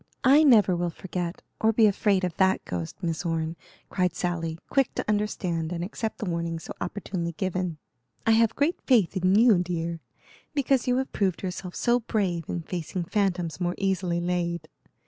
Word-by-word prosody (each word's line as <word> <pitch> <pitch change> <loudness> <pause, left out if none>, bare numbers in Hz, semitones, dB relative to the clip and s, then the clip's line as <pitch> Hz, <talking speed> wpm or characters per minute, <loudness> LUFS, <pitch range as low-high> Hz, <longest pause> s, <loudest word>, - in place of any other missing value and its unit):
"I 280 +4 +7
never 210 - +6
will 175 0 -1
forget, 175 0 -5 0.2
or 220 - +4
be 225 0 +4
afraid 200 -1 +2
of 180 -2 -1
that 190 0 +2
ghost, 85 -2 -4
Miss 165 +1 -1
Orne," 165 -1 -1 0.4
cried 180 -3 0
Sally, 165 -3 -2
quick 270 -2 +1
to - - -3
understand 185 -6 -1
and 170 -1 -3
accept 220 +3 -4
the - - -4
warning 170 -2 -2
so 165 - -8
opportunely 180 -4 -3
given. 180 -1 -2 0.5
"I 225 - +4
have 225 0 +4
great 295 +5 +1
faith 220 -9 +3
in 185 +1 +3
you, 220 -3 +6
dear, 170 -1 -2 0.6
because 270 -3 +2
you 250 0 +3
have 265 0 -2
proved 190 -4 0
yourself 180 -1 -5
so 240 0 +2
brave 190 -8 -1
in 170 - -3
facing 175 +1 -4
phantoms 180 -3 -1
more 175 0 0
easily 190 -3 0
laid. 170 -2 -2
180 Hz, 175 wpm, -26 LUFS, 170-210 Hz, 0.6 s, I